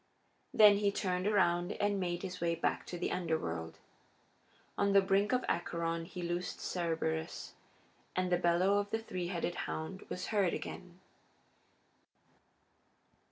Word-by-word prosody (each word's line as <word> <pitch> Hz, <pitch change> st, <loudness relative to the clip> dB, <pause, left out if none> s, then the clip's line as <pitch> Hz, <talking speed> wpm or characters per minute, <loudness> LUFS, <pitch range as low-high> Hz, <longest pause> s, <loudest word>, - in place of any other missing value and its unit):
Then 210 Hz, -2 st, +7 dB
he 205 Hz, -1 st, +2 dB
turned 185 Hz, -1 st, -1 dB
around 175 Hz, -3 st, +2 dB
and 205 Hz, -1 st, 0 dB
made 175 Hz, -1 st, -2 dB
his 180 Hz, -2 st, -5 dB
way 170 Hz, -1 st, +1 dB
back 165 Hz, -, -1 dB
to 175 Hz, -, -5 dB
the 175 Hz, -, -2 dB
Underworld. 85 Hz, -, -2 dB, 1.0 s
On 200 Hz, 0 st, +2 dB
the 200 Hz, -, +8 dB
brink 195 Hz, +2 st, +2 dB
of 255 Hz, 0 st, +1 dB
Acheron 170 Hz, -1 st, -1 dB
he 180 Hz, +1 st, -7 dB
loosed 175 Hz, +1 st, -3 dB
Cerberus, 160 Hz, -, -2 dB, 0.6 s
and 185 Hz, 0 st, 0 dB
the 175 Hz, -, +4 dB
bellow 180 Hz, +3 st, +3 dB
of 205 Hz, 0 st, -3 dB
the 225 Hz, -, 0 dB
three 185 Hz, -6 st, -4 dB
headed 175 Hz, -1 st, -2 dB, 0.2 s
hound 175 Hz, +5 st, -4 dB
was 180 Hz, -, -4 dB
heard 195 Hz, -4 st, +3 dB
again. 180 Hz, 0 st, -8 dB
180 Hz, 140 wpm, -33 LUFS, 170-200 Hz, 1.0 s, the